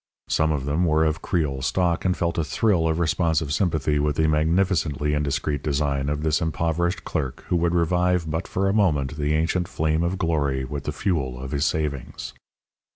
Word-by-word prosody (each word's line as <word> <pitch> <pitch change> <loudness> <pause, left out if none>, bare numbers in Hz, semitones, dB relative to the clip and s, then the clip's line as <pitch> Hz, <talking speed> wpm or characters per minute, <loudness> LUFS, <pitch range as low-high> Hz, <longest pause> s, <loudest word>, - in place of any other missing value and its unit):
Some 80 0 +2
of 70 -3 -2
them 75 +5 +1
were 80 -1 +3
of 80 0 -1
Creole 75 -6 -1
stock 85 +5 0
and 90 -1 +1
felt 85 -1 -1
a - - +2
thrill 90 -1 +1
of 80 0 0
responsive 80 -2 +1
sympathy 80 -5 +1
with 75 0 0
the 80 +1 +2
magnificently 80 -2 +1
indiscreet 75 0 -1
design 70 -1 0
of 75 +1 -2
this 80 +1 +1
impoverished 85 +2 -1
clerk 65 -3 -3
who - - +2
would 85 0 +1
revive 90 0 +1
but 80 +3 -3
for 95 +1 0
a 95 - +2
moment 75 -10 +1
the 75 0 0
ancient 85 +3 0
flame 80 0 0
of 85 +2 -1
glory 70 -6 0
with 70 0 -6
the - - -1
fuel 75 -7 -2
of 65 0 -6
his 70 0 0
savings. 75 -5 -3
80 Hz, 190 wpm, -24 LUFS, 75-85 Hz, -, were